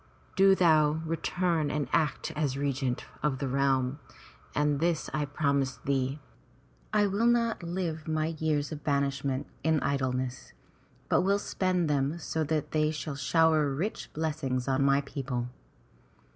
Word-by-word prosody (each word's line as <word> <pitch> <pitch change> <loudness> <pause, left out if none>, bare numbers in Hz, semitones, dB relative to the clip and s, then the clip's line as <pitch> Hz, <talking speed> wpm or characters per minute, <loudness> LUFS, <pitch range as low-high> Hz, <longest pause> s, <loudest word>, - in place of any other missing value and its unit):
Do 195 0 +6
thou 155 -3 +3
return 165 -1 0
and 150 -1 -1
act 155 -4 +1
as 145 -3 -1
regent 135 -3 -1 0.2
of 150 -3 0
the 135 +1 -2
realm, 135 0 +1 0.6
and 145 -1 +2
this 165 -1 0
I 150 +1 0
promise 140 -2 0
thee 135 +1 0 0.4
— - - -32 0.3
I 210 -1 +3
will 205 +4 +1
not 235 -3 +2
live 170 -2 -3
my 155 +1 0
years 150 -2 0
of 150 -2 -6
banishment 140 -1 0 0.2
in 160 0 +3
idleness, 130 -2 -2 0.5
but - - +3
will 195 +2 +3
spend 185 -4 0
them 145 +2 0
so 160 -1 -2
that 155 0 -1
they 155 -1 +2
shall 155 -1 -4
shower 155 +2 +3
rich 190 +10 -3
blessings 150 -5 -2
on 135 +1 +2
my 140 0 +4
people.' 135 -3 -4
150 Hz, 145 wpm, -29 LUFS, 140-160 Hz, 0.6 s, Do